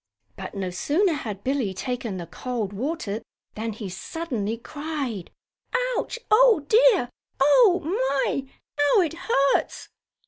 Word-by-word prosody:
But - - -8
no 190 -2 -3
sooner 320 - +1
had 210 -9 -5
Billie 255 -8 -1
taken 240 -3 -3
the 175 - -5
cold 215 +3 -4
water 225 -2 -3 0.3
than 225 +1 -3
he 210 -1 -6
suddenly 230 - -4
cried: 280 - -5 0.7
"Ouch! - - -2
Oh, 440 -8 +6
dear! 440 - +5 0.3
Oh, 355 - +5 0.4
my, 270 -1 -2 0.3
how 290 +7 +5
it 325 -4 0
hurts!" 280 -6 0
270 Hz, 125 wpm, -25 LUFS, 210-330 Hz, 0.7 s, Oh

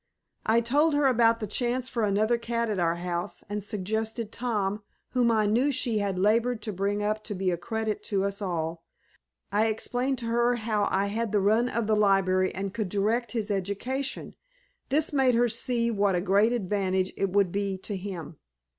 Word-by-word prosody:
I 225 +2 +4
told 290 +6 +2
her 290 -1 +2
about 230 -3 +4
the 215 - -3
chance 245 +4 -1
for 235 - -2
another 215 +3 +2
cat 235 -1 -1
at 200 - -1
our 170 -1 +2
house, 175 +2 -4
and 205 0 -4
suggested 220 +2 -3
Tom, 210 -4 -2 0.3
whom 245 -2 +2
I 220 -2 +3
knew 240 +8 +2
she 235 -4 +1
had 200 -2 -1
labored 225 +5 +2
to 215 - -3
bring 200 +2 -1
up 215 +1 -1
to 205 - -4
be 185 0 0
a - - +1
credit 220 +4 -3
to 195 -2 0
us 200 +1 -2
all. 165 -3 -3 0.7
I 210 +2 +3
explained 245 +4 -1
to 235 - -5
her 235 +1 +2
how 215 -3 0
I 195 +1 +1
had 220 +2 -2
the 210 - +3
run 220 +5 +3
of 235 -2 -1
the 215 0 +2
library 195 -2 +3
and 195 0 -4
could 215 -5 -2
direct 215 +3 0
his 220 -3 -2
education; 205 +8 -3 0.6
this 300 +3 +1
made 265 -3 +3
her 240 +1 +4
see 235 0 0
what 200 -3 +2
a 175 - +1
great 200 +5 +3
advantage 190 -4 0
it 195 - 0
would 195 -1 +2
be 195 0 -1
to 200 +2 -5
him. 180 -5 -6
215 Hz, 195 wpm, -27 LUFS, 195-235 Hz, 0.7 s, I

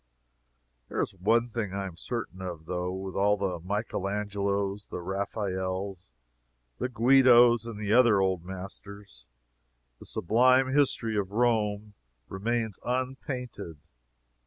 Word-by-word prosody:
There - - -3
is 105 - -5
one 115 +6 +2
thing 105 -4 -3
I 100 0 -2
am 95 -3 -7
certain 100 -1 -5
of, 85 -4 -6
though. 90 +1 -2
With 95 0 -5
all 105 +1 +2
the 95 -3 -2
Michael 100 +2 -3
Angelos, 100 -1 -2
the - - -6
Raphaels, 95 - -3 0.7
the 125 - -1
Guidos 120 -1 +5
and 115 -3 -6
the 105 0 0
other 120 -5 +6
old 95 -3 0
masters, 95 -5 -10 0.7
the - - -12
sublime 130 +6 +3
history 125 -6 +2
of 100 -2 -1
Rome 105 -2 0 0.4
remains 110 +2 -2
unpainted! 125 - -4
100 Hz, 125 wpm, -28 LUFS, 95-120 Hz, 0.7 s, other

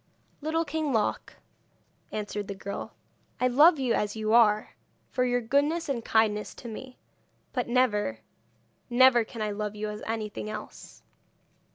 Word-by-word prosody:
'Little 320 +2 0
King 310 0 -2
Loc,' 220 -4 -1 0.8
answered 210 -1 -4
the 200 - -5
girl, 200 +1 -6 0.4
'I 255 - +3
love 305 +7 +6
you 255 -4 +1
as 210 0 -1
you 215 0 -1
are, 215 -3 +4 0.4
for 250 - +1
your 245 0 +1
goodness 285 +8 +1
and 255 -5 -2
kindness 215 -2 +1
to 240 - -10
me; 250 +3 -8 0.6
but 250 - -1
never, 225 - +1 0.7
never 245 -1 +6
can 220 0 -6
I 210 - -1
love 210 0 -4
you 210 0 -3
as 210 +1 -6
anything 215 -1 -4
else.' 215 0 -9
230 Hz, 150 wpm, -28 LUFS, 210-260 Hz, 0.8 s, love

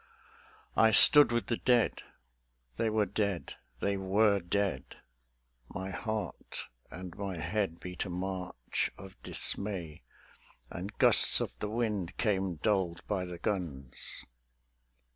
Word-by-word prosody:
I 115 - +4
stood 145 +5 +10
with 120 -1 -1
the 115 - -2
Dead.... 125 -2 +1 0.7
They 110 - -1
were 110 -1 0
dead; 100 -2 -3 0.3
they 100 0 -1
were 100 +2 +1
dead; 90 -5 -3 0.7
My 95 +1 -7
heart 105 -1 -6 0.3
and 90 0 -10
my 100 -3 -6
head 85 +1 -3
beat 90 +1 -6
a - - -7
march 90 -8 -4
of 95 -1 -14
dismay: 90 -7 -3 0.7
And 95 +5 -8
gusts - - +5
of - - -4
the 105 - -4
wind 105 -6 -3
came 95 -5 -1
dulled 90 -1 -2
by 95 -3 -2
the 90 -1 -8
guns 80 -10 -4
95 Hz, 125 wpm, -30 LUFS, 90-105 Hz, 0.7 s, stood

